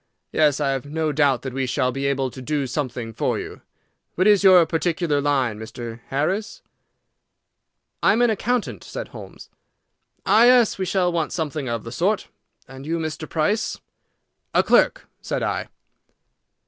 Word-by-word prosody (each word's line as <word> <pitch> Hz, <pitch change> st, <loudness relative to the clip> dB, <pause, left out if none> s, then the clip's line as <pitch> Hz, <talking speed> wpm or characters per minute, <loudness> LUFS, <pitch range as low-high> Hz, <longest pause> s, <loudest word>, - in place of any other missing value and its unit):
"Yes, 150 Hz, -2 st, +3 dB
I 140 Hz, -2 st, +1 dB
have 135 Hz, +1 st, -3 dB
no 155 Hz, +1 st, -1 dB
doubt 140 Hz, -4 st, +2 dB
that 130 Hz, -2 st, -5 dB
we 135 Hz, 0 st, -1 dB
shall 125 Hz, 0 st, 0 dB
be 135 Hz, +2 st, -2 dB
able 135 Hz, -2 st, -1 dB
to 130 Hz, -, -10 dB
do 145 Hz, +1 st, -1 dB
something 125 Hz, -4 st, -4 dB
for -, -, -1 dB
you. -, -, -7 dB, 0.5 s
What 185 Hz, -, +1 dB
is 205 Hz, -2 st, +5 dB
your 185 Hz, -3 st, +7 dB
particular 160 Hz, -2 st, 0 dB
line, 130 Hz, -7 st, 0 dB
Mr. 115 Hz, +1 st, -7 dB
Harris?" 180 Hz, +10 st, -2 dB, 1.4 s
"I -, -, +4 dB
am 235 Hz, +3 st, +2 dB
an 240 Hz, -, +4 dB
accountant," 215 Hz, -, -2 dB
said -, -, -7 dB
Holmes. -, -, -12 dB, 0.7 s
"Ah 225 Hz, +2 st, +6 dB
yes, 245 Hz, -5 st, +5 dB
we 190 Hz, -, 0 dB
shall 180 Hz, -1 st, +1 dB
want 165 Hz, -3 st, -1 dB
something 150 Hz, -5 st, -3 dB
of 115 Hz, -3 st, -3 dB
the 115 Hz, -, -8 dB
sort. 190 Hz, -, 0 dB, 0.4 s
And 135 Hz, +2 st, -11 dB
you, 165 Hz, +1 st, -1 dB
Mr. 155 Hz, -1 st, -5 dB
Price?" 205 Hz, +8 st, 0 dB, 0.8 s
"A -, -, +5 dB
clerk," -, -, +3 dB, 0.2 s
said -, -, -3 dB
I. -, -, -2 dB
150 Hz, 160 wpm, -22 LUFS, 130-180 Hz, 1.4 s, your